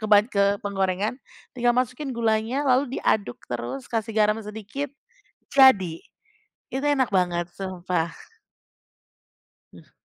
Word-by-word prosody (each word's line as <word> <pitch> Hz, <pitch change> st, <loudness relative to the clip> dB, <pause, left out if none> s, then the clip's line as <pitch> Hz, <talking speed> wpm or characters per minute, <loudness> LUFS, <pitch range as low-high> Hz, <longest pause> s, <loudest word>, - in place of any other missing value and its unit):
ke -, -, -1 dB
ban 205 Hz, +1 st, +6 dB
ke 200 Hz, -2 st, +2 dB
penggorengan, 195 Hz, +3 st, -1 dB, 0.4 s
tinggal 240 Hz, 0 st, +3 dB
masukin 255 Hz, +2 st, -1 dB
gulanya 225 Hz, +5 st, 0 dB
lalu 260 Hz, +1 st, +2 dB
diaduk 200 Hz, -, 0 dB
terus, 125 Hz, +2 st, -5 dB
kasih 225 Hz, -1 st, -2 dB
garam 215 Hz, 0 st, +4 dB
sedikit, 220 Hz, +7 st, -5 dB, 0.6 s
jadi. 195 Hz, -12 st, +5 dB, 0.7 s
Itu 270 Hz, +2 st, -2 dB
enak 270 Hz, -3 st, +2 dB
banget, 175 Hz, -2 st, +1 dB
sumpah. 180 Hz, -3 st, -2 dB, 1.7 s
Mh -, -, -16 dB
210 Hz, 115 wpm, -25 LUFS, 185-250 Hz, 1.7 s, ban